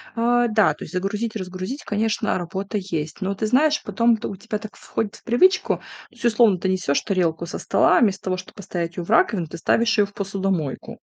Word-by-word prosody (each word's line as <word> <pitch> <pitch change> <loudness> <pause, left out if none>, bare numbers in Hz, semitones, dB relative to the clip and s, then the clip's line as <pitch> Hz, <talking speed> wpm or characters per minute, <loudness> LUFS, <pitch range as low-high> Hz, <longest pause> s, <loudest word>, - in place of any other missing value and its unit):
Э, 240 +1 +3
да, 215 -2 +4
то - - -10
есть 155 - -10
загрузить, 205 +5 -2
разгрузить, 185 +7 -5
конечно, 215 +1 0
работа 190 +4 -4
есть. 165 -4 -4
Но 195 +1 -1
ты 215 - -1
знаешь, 295 +6 +3
потом 230 -1 +2
т - - -5
у 200 - -6
тебя 205 +3 -4
так 215 0 -10
входит 215 -2 -4
в - - -17
привычку. 360 +11 +3
То - - -21 0.3
есть - - -9
условно 225 -4 +4
ты 190 +2 -1
несёшь 185 -7 +1
тарелку 170 -5 0
со 170 - -5
стола, - - +3
а - - +4
вместо 200 -4 +2
того, 185 -1 0
чтобы 185 - -10
поставить 175 -4 -5
её 175 - -2
в - - -16
раковину, 215 - +3
ты 160 - -8
ставишь 230 +7 +2
её 205 - +5
в 200 - -14
посудомойку. 195 -7 -3
200 Hz, 220 wpm, -23 LUFS, 185-225 Hz, 0.3 s, её